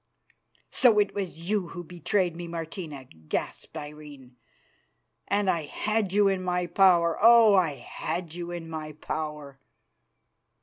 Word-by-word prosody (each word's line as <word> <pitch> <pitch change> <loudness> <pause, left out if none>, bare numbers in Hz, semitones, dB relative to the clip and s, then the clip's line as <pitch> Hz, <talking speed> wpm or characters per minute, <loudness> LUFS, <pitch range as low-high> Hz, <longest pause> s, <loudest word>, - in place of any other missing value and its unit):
"So 235 -5 +4
it 205 -1 +2
was 185 -5 -5
you 205 -3 0
who 175 +1 -7
betrayed 175 +1 -1
me, 175 0 -6
Martina," 165 -3 -6
gasped 80 - -5
Irene; 145 -4 -10 0.9
"and 200 0 +1
I 165 -4 +1
had 215 +4 -1
you 205 +1 +4
in 190 -1 +1
my 180 -1 -1
power. 175 -2 +4
Oh! 230 -1 +7
I 180 -6 +3
had 160 +6 -5
you 175 0 -6
in 175 -2 -6
my 155 -1 -6
power!" 150 -2 -6
170 Hz, 135 wpm, -27 LUFS, 155-195 Hz, 0.9 s, Oh